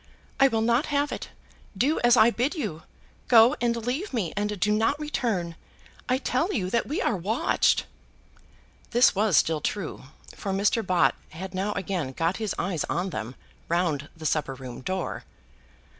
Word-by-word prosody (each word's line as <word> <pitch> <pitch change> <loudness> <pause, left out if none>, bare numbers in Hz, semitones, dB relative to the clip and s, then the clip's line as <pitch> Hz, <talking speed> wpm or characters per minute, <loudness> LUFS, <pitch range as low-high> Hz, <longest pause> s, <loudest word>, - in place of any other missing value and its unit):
"I 275 - +7
will 225 -4 0
not 235 +5 +2
have 290 0 0
it. - - -5 0.5
Do 280 +9 +2
as 240 0 +5
I 230 +1 +6
bid 255 +9 -1
you. 210 - -4 0.5
Go 235 +3 +7
and 235 -1 +2
leave 280 +9 -2
me, 190 -8 -1
and 210 -1 -2
do 210 +3 +2
not 225 +7 +1
return. 220 - -2 0.5
I 255 - +3
tell 280 +8 0
you 185 - -2
that 235 - +1
we 295 - -1
are 230 - +1
watched." 200 +6 +1 1.0
This 240 +2 +5
was 205 -5 +2
still 160 -2 +2
true, 185 -5 -4 0.3
for 195 - -4
Mr. 205 +3 +2
Bott 180 -3 +3 0.2
had 185 +3 -8
now 195 +3 -1
again 180 -8 -3
got 165 +6 0
his 215 -3 -2
eyes 180 -5 -1
on 180 +2 -2
them, 125 -2 -5 0.3
round 165 -4 0
the 160 - -9
supper 150 -3 0
room 130 -2 -9
door. 185 +5 -3
205 Hz, 170 wpm, -26 LUFS, 175-240 Hz, 1.0 s, I